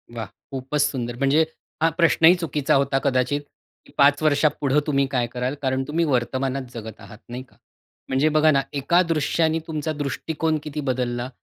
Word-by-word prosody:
वाह, 115 -1 -4 0.3
खूपच 135 +2 -2
सुंदर! 125 -5 -1
म्हणजे 140 +4 +3 0.4
हा 165 - +4
प्रश्नही 170 +1 +5
चुकीचा 150 -5 0
होता 135 0 +2
कदाचित, 135 +1 +1 0.4
की - - -18
5 145 +1 +5
वर्षापुढं 145 -1 +2
तुम्ही 140 -2 +2
काय 125 -2 0
कराल? 125 +2 -2
कारण 130 0 0
तुम्ही 165 +3 0
वर्तमानात 130 0 -1
जगत 110 -2 -8
आहात, 100 +1 -12
नाही 125 +2 -6
का. 130 - -26 0.5
म्हणजे 135 +4 +2
बघा 155 0 +4
ना, 140 -2 +3
एका 145 +6 +2
दृश्याने 160 +1 +1
तुमचा 155 -1 -3
दृष्टिकोन 155 +2 -2
किती 150 0 -5
बदलला 125 -2 -2
140 Hz, 165 wpm, -23 LUFS, 130-155 Hz, 0.5 s, प्रश्नही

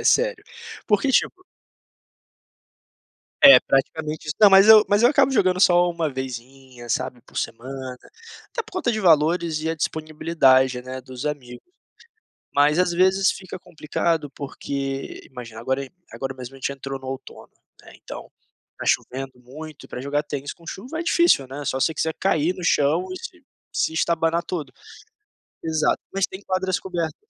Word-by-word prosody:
É - - -7
sério. 485 -2 +2 0.4
Porque, 210 +6 +2
tipo 370 +7 +1 2.0
É, 275 -2 +11
praticamente 155 +3 -1
isso. 150 - -3
Não, 210 - +9
mas 195 +2 +7
eu 215 -1 +9
mas 205 +2 +3
eu 240 - +7
acabo 275 -1 +3
jogando 185 -7 +2
só 175 -2 +5
1 170 -2 -1
vezinha, 130 -1 -8
sabe, 120 +1 -2
por - - -18
semana. 130 +1 -5 0.5
Até 465 - -3
por - - -18
conta 365 -10 0
de 215 - -2
valores 165 -2 +3
e 160 - -2
a 165 - 0
disponibilidade, 150 -5 +2
né, 130 +1 -7
dos 130 +2 -8
amigos. 130 -5 -6 0.9
Mas 145 +3 +3
às 180 -1 +2
vezes 190 +2 +3
fica 185 -1 -8
complicado 160 -2 -2
porque, 135 0 -5
imagina, 120 -4 -10
agora 130 +3 -2 0.2
agora 135 0 -5
mesmo 130 0 -9
a - - -12
gente 135 - -2
entrou 135 0 -6
no 130 - -10
outono, 135 0 -8 0.3
né, - - -15
então, - - -10 0.4
está - - -8
chovendo 135 +1 -1
muito. 150 +4 -11
E - - -16
para 125 - -7
jogar 145 +2 -1
tênis 145 -1 -5
com 170 - -21
chuva 250 - -6
é - - -2
difícil, 340 - +3
né. 140 +3 -7
Só 130 - -1
você 160 - +1
quiser 160 0 -1
cair 170 -2 +1
no 185 - -8
chão 160 +3 +2
e 185 - -5
se 355 - -10 0.3
se - - +1
estabanar 165 0 +1
todo. 155 -7 -5 0.9
Exato, 160 -1 +1
mas 195 -1 +1
tem 190 - -10
quadras 185 -1 -1
cobertas 170 -4 -3
155 Hz, 165 wpm, -23 LUFS, 135-185 Hz, 2.0 s, É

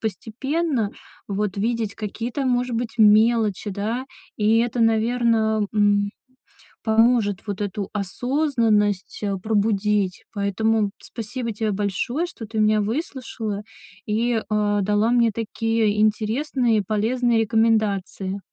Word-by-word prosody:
постепенно, 250 - -2 0.4
вот, 200 -1 -2
видеть 220 0 -1
какие-то, 230 +5 -4
может 245 -1 0
быть, 235 0 -4
мелочи, 215 -1 +4
да. 215 +6 -3 0.3
И 215 +1 +3
это, 240 +1 0
наверно, 225 -1 +2
м, 205 -1 +3 0.7
поможет 220 -3 +3
вот 205 0 -4
эту 200 -1 -3
осознанность, 215 - 0
э, 200 -1 0
пробудить. 205 -2 0
Поэтому 210 +1 +1
спасибо 235 +1 -5
тебе 215 0 -1
большое, 205 - -1
что 250 -9 -9
ты 220 0 -4
меня 215 0 +3
выслушала 225 -3 -4 0.4
и, 230 +3 0 0.2
э, 210 -1 +1
дала 210 +3 +2
мне 235 -2 +3
такие 225 -1 0
интересные 225 +1 +1
полезные 225 +3 +1
рекомендации. 210 -3 0
220 Hz, 110 wpm, -23 LUFS, 205-235 Hz, 0.7 s, мелочи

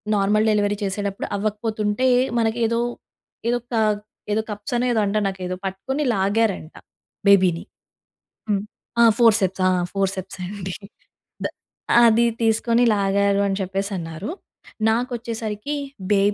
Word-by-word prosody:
Normal 210 +2 +2
delivery 205 -1 +1
చేసేడప్పుడు 200 0 -3
అవ్వకపోతుంటే 215 +3 -1 0.3
మనకి 225 +1 0
ఏదో, 230 +1 0 0.7
ఏదో 240 0 +1
క - - +1 0.6
ఏదో 220 - +2
కప్స్ 210 +2 -5
అనో 240 +1 +1
ఏదో 230 - +2
అంటారు 205 +1 0
నాకేదో 185 -1 -4
పట్టుకొని 195 +10 -2
లాగారంట 195 -4 0 0.5
బేబీని. 185 -4 +5 0.9
హ్మ్. 200 -2 +1 0.4
ఆ! - - +8
ఫోర్సెప్స్ 210 -5 +4
ఆ! - - +4 0.2
ఫోర్సెప్సే 195 -1 -2
అండి. 195 -3 -5 0.7
ద - - +2 0.6
"అది 230 0 +5 0.2
తీసుకొని 230 +2 +3
లాగారు" 200 0 +2
అని 195 0 -1
చెప్పేసన్నారు. 190 - -4 0.6
నాకొచ్చేసరికి 230 +1 -2 0.4
బె 200 - +4
205 Hz, 115 wpm, -22 LUFS, 195-225 Hz, 0.9 s, ఆ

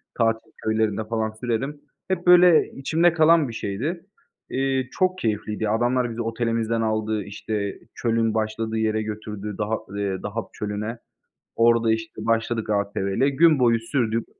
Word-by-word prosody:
tatil 115 -1 0
köylerinde, 110 -1 0
falan, 110 -1 -1
sürerim." 135 +5 -2 0.3
Hep, 180 -1 -2
böyle, 180 -2 +7
içimde 165 +5 +2
kalan 160 -2 +5
bir 115 - -7
şeydi. 140 - -3 0.4
İii, 135 -1 -1
çok 185 0 +1
keyifliydi, 105 0 -2
ya, 105 - 0
adamlar 120 +1 +1
bizi 115 +1 -4
otelimizden 115 0 -1
aldı. 110 -1 -1
İşte, 100 0 -4 0.2
çölün 115 -2 +1
başladığı 110 0 -2
yere 110 0 +1
götürdü, 105 -1 -6
Daha 110 +1 -1
ııı, 100 -2 -3
Dahab 110 +2 -3
Çölü'ne. 105 +3 -4 0.6
Orada, 115 -1 +4
işte, 110 0 -4
başladık 115 -1 0
ATV'yle, 100 +5 0
gün 155 +1 +4
boyu 115 -2 +3
sürdük. 115 -2 -1
115 Hz, 140 wpm, -24 LUFS, 110-125 Hz, 0.6 s, böyle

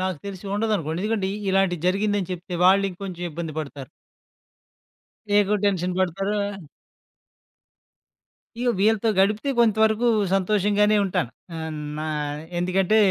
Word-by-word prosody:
నాకు 185 -4 -2
తెలిసి 195 -1 -7
ఉండదనుకోండి. 200 -7 -1
ఎందుకంటే 210 -3 0 0.2
ఇలాంటిది 190 -4 +1
జరిగిందని 200 0 0
చెప్తే 180 0 -6
వాళ్ళింకొంచెం 190 -1 +1
ఇబ్బంది 165 0 -5
పడతారు. 140 -4 -6 1.5
ఎక్కువ 205 +1 +3
టెన్షన్ 185 -2 0
పడతారు. 195 +3 0 2.2
ఇగ 245 +1 0
వీళ్ళతో 220 +1 +3
గడిపితే 210 +8 +2
కొంతవరకు 220 0 +3 0.3
సంతోషంగానే 210 +2 +2
ఉంటాను. 130 -10 -1 0.3
ఆహ్, 160 0 -4 0.3
నా 155 - -3 0.5
ఎందుకంటే 185 +3 +2
195 Hz, 100 wpm, -24 LUFS, 180-210 Hz, 2.2 s, ఎక్కువ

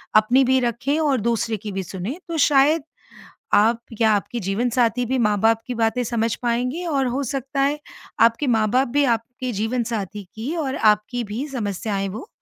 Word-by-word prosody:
अपनी 240 +5 +5
भी 260 +1 +3
रखें 250 +5 -1
और 280 -6 +1
दूसरे 225 0 0
की 210 +1 -7
भी 195 0 -3
सुने 190 - -6
तो 335 -1 -3
शायद 290 +2 +4 0.7
आप 225 +3 +4 0.2
या 220 -1 +5
आपकी 210 +4 -1
जीवनसाथी 235 +4 +1
भी 260 +2 0
माँ-बाप 220 0 +3
की 250 - -3
बातें 230 +2 +1
समझ 230 -1 0
पाएँगी 250 +8 -1
और 275 -4 +1
हो 250 +3 -1
सकता 275 +2 -3
है, 290 +2 +1 0.4
आपके 230 +5 +3
माँ-बाप 235 +2 +2
भी 285 +4 +1
आपके 245 +2 -2
जीवनसाथी 220 -2 -2
की 250 +10 -4
और 275 -5 -2
आपकी 215 +3 +2
भी 225 +7 -4
समस्याएँ 205 -4 -2
वो 220 - -7
235 Hz, 170 wpm, -22 LUFS, 215-265 Hz, 0.7 s, अपनी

